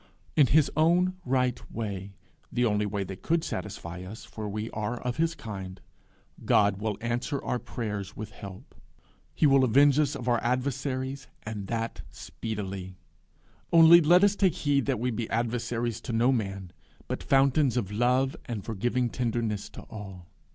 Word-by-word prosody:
In 145 -4 +6
his 150 +3 +4
own 175 +4 +3
right 125 -1 +1
way, 100 -3 -5 0.4
the 125 0 +1
only 105 -2 +1
way 100 -1 -2
that 95 0 -8
could 165 0 +1
satisfy 85 +2 -5
us, 95 +4 -9
for 105 -1 -6
we 110 +2 -4
are 110 +3 -3
of 125 -1 -3
his 165 +1 +1
kind, 95 - -7 0.6
will - - -15
God 105 0 +2
answer 120 +4 -1
our 125 - -1
prayers 105 -4 -5
with 110 0 -6
help. 95 -1 -11 0.6
He - - +3
will 135 -2 +5
avenge 140 +4 +5
us 145 -2 +1
of 125 - -6
our 120 -1 +2
adversaries, 130 +2 -2 0.2
and 105 -2 -5
that 115 +1 -3
speedily. 95 -4 -6 0.7
Only 170 +1 +9
let 175 +4 +5
us 205 0 +4
take 190 -5 +2
heed 140 -4 +1
that - - +1
we 125 +2 0
be 115 0 -3
adversaries 120 0 -1
to 120 - -5
no 120 +3 +3
man, 95 -6 -2 0.4
but - - -3
fountains 135 -1 +3
of 105 -5 -1
love 125 +5 +2
and 110 -5 -5
forgiving 120 +3 0
tenderness 115 -3 -2
to - - -10
all. 95 -5 -9
120 Hz, 165 wpm, -28 LUFS, 105-135 Hz, 0.7 s, Only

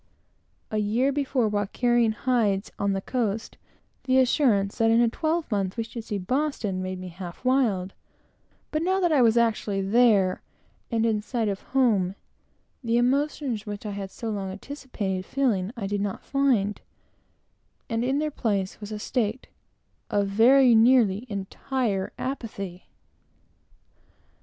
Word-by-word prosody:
A 215 - 0
year 230 +6 +1
before, 270 -4 0
while 205 -1 -1
carrying 240 0 +2
hides 220 -5 0
on 200 -1 +1
the 195 - -2
coast, 225 -4 -2 0.5
the 260 0 +3
assurance 240 -7 +2
that 225 0 +4
in 225 +1 +4
a 240 - +5
twelvemonth 235 - -1
we 230 - 0
should 230 0 -8
see 210 - -3
Boston, 215 -3 -1
made 185 0 -4
me 185 0 -7
half 175 +5 -9
wild; 220 -8 +1 0.8
but 310 - 0
now 375 +3 +1
that 350 -3 +2
I 290 -4 +4
was 230 -1 +4
actually 220 -3 +1
there, 200 -2 +3 0.5
and 230 -1 +1
in 220 -2 +1
sight 230 0 -2
of 200 -1 -2
home, 210 -8 +1 0.7
the 230 0 +1
emotions 260 -3 0
which 205 +1 -6
I 210 - -3
had 200 -1 -5
so 225 +3 -5
long 195 -2 -3
anticipated 205 -4 -5
feeling, 215 -6 0
I 210 - -3
did 200 0 -2
not 200 -1 -4
find, 245 -8 +1 1.1
and 225 +1 -1
in 265 +3 +1
their 305 +1 -1
place 200 -7 -2
was 210 +1 -7
a 215 - -3
state 225 +2 -2 0.6
of 205 -1 +1
very 245 +5 +6
nearly 225 -2 +4
entire 200 +1 -2
apathy. 200 -9 -5
225 Hz, 145 wpm, -26 LUFS, 200-255 Hz, 1.1 s, very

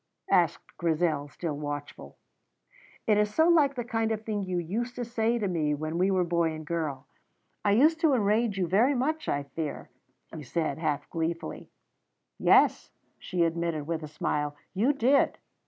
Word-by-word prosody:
asked - - +1
Grizel, 160 -3 0
still 155 +1 -4
watchful. 145 0 -6 0.9
"It 210 -1 +3
is 210 0 +1
so 320 +9 +3
like 295 -5 +4
the 245 - -2
kind 225 -1 -1
of 220 0 -3
thing 210 -2 -2
you 185 -2 -2
used 225 +9 -3
to 245 - -3
say 235 0 0
to 210 -3 -1
me 155 -5 0
when 155 +3 -3
we 185 +2 +3
were 185 -2 +2
boy 170 -2 +1
and 155 0 -7
girl. 150 -5 -3 0.6
I 205 - +3
used 310 +9 +4
to 315 -5 +4
enrage 215 -1 +1
you 185 - +1
very 230 +10 +3
much, 305 +5 -1
I 145 - 0
fear," 150 +2 -6 0.4
he 155 - -6
said, 145 +2 -2
half 155 -3 -1
gleefully. 165 0 -4 0.7
"Yes," - - +4 0.3
she 180 -2 -1
admitted, 165 -2 -1
with 165 0 -3
a 155 - -6
smile, 150 -1 -2 0.2
"you 220 +9 +3
did." 275 0 +2
180 Hz, 170 wpm, -28 LUFS, 155-230 Hz, 0.9 s, like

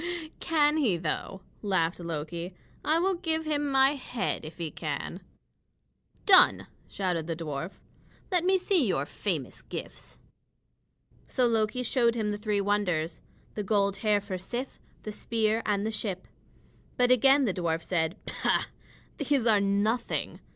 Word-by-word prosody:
"Can 305 -2 +2
he, 230 - +2
though?" 170 +3 -3 0.2
laughed 185 -5 0
Loki. 170 +2 -5 0.3
"I 310 +2 +3
will 380 +3 +2
give 325 -3 -2
him 295 -2 0
my 270 0 +5
head 255 - -2
if 155 +1 -9
he 165 -3 -4
can." 155 +4 -4 1.0
"Done!" 375 -2 +7 0.2
shouted 180 -5 -2
the 165 - -2
dwarf. 160 +2 -5 0.6
"Let 355 -2 +2
me 380 +1 +4
see 370 -3 +2
your - - 0
famous - - -4
gifts." - - -8 1.1
So 255 - +1
Loki 225 +1 +1
showed 235 -1 +2
him 215 -2 -1
the 205 - -4
three 210 -1 0
wonders: 180 -6 0 0.3
the 210 - -3
gold 200 -1 +1
hair 210 -2 +2
for 195 -2 -5
Sif, 245 +8 -5 0.2
the 215 - -5
spear, 220 +1 0
and 205 -1 +1
the 220 - -1
ship. 200 -4 -3 0.7
But 250 0 +3
again 270 +3 +5
the 200 - 0
dwarf 165 -2 -1
said: 165 -1 0
"Pooh! - - +1 0.5
These 285 -4 +1
are 215 -3 +5
nothing. 205 +4 0
210 Hz, 145 wpm, -28 LUFS, 180-265 Hz, 1.1 s, Done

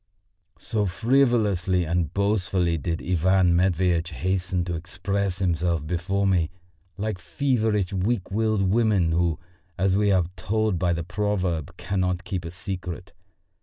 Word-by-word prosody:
So 105 -2 -1
frivolously 105 -5 +2
and 85 -1 0
boastfully 95 -4 +1
did 80 +3 -3
Ivan 90 0 +3
Matveitch 90 -1 +2
hasten 90 +1 -1
to 90 - -3
express 95 +3 -2
himself 85 -4 0
before 95 +4 -1
me, 90 -4 +2 0.5
like 105 -2 -3
feverish 110 -7 0
weak 95 +1 -1
willed 110 -1 +1
women 100 -4 +2
who, 85 -1 +1 0.4
as 95 0 +2
we 100 0 +3
are 95 -3 +3
told 110 -2 0
by 90 -2 +2
the 85 0 -2
proverb, 90 -5 -2
cannot 90 -1 -1
keep 90 -3 -4
a - - -4
secret. 90 -1 -6
95 Hz, 130 wpm, -25 LUFS, 85-100 Hz, 0.5 s, Ivan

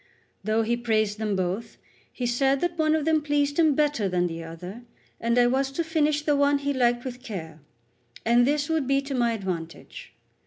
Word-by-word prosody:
Though 215 +2 +1
he 235 +2 +1
praised 215 -3 0
them 210 -2 -1
both, 185 +5 -3 0.3
he 250 - -4
said 270 +3 +2
that 350 -1 -1
one 315 -1 +2
of 310 -2 -1
them 320 -1 +3
pleased 290 0 0
him 315 -4 +4
better 290 -9 +1
than 180 -1 +1
the 165 -1 -4
other; 180 +7 -8 0.4
I 235 +1 +3
was 265 +2 +1
to 335 - -1
finish 305 -2 +1
the 295 -1 +2
one 285 0 +3
he 285 0 -2
liked 245 -1 +1
with 250 -1 -6
care; 165 - -7 0.7
and 240 +2 +4
this 290 0 +1
would 320 -5 0
be 275 0 +3
to 275 0 -5
my 240 -2 +1
advantage. 180 -6 -6
245 Hz, 195 wpm, -26 LUFS, 215-290 Hz, 0.7 s, him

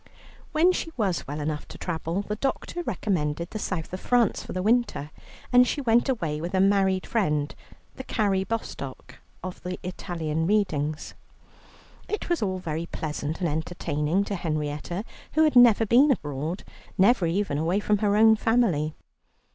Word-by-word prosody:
When 325 +4 +4
she 345 - -3
was 195 -7 -1
well 145 +2 -4
enough 150 0 -3
to - - -10
travel, 170 +2 -3
the 210 - -3
doctor 275 +8 -2
recommended 170 - -2
the 215 - -4
South 180 -4 -4
of 185 - -3
France 240 -2 +2
for - - -8
the 185 - -2
winter, 220 -9 +1 0.4
and 250 0 +7
she - - -1
went 240 -1 +3
away 160 - -1
with 175 +3 -3
a - - +3
married 195 -1 +3
friend, 150 -10 0 0.4
the 260 - -6
Carrie 200 -6 +1
Bostock 140 - -6 0.2
of 185 -1 -6
the 180 0 -4
Italian 165 -3 -3
readings. 155 -8 0 0.9
It 425 - -4
was 345 -5 +1
all 190 -3 0
very 165 -2 -4
pleasant 155 +1 -4
and 175 - +2
entertaining 155 +2 -1
to 200 - -4
Henrietta, 155 +3 -3 0.3
who 315 - +4
had 305 -4 +3
never 235 -3 +7
been 250 +7 +5
abroad, 155 - -2 0.3
never 195 -2 +4
even 170 -4 0
away 170 +5 +1
from 210 0 +1
her 205 -1 +2
own 220 0 +7
family. 205 -10 +1
185 Hz, 165 wpm, -26 LUFS, 155-220 Hz, 0.9 s, and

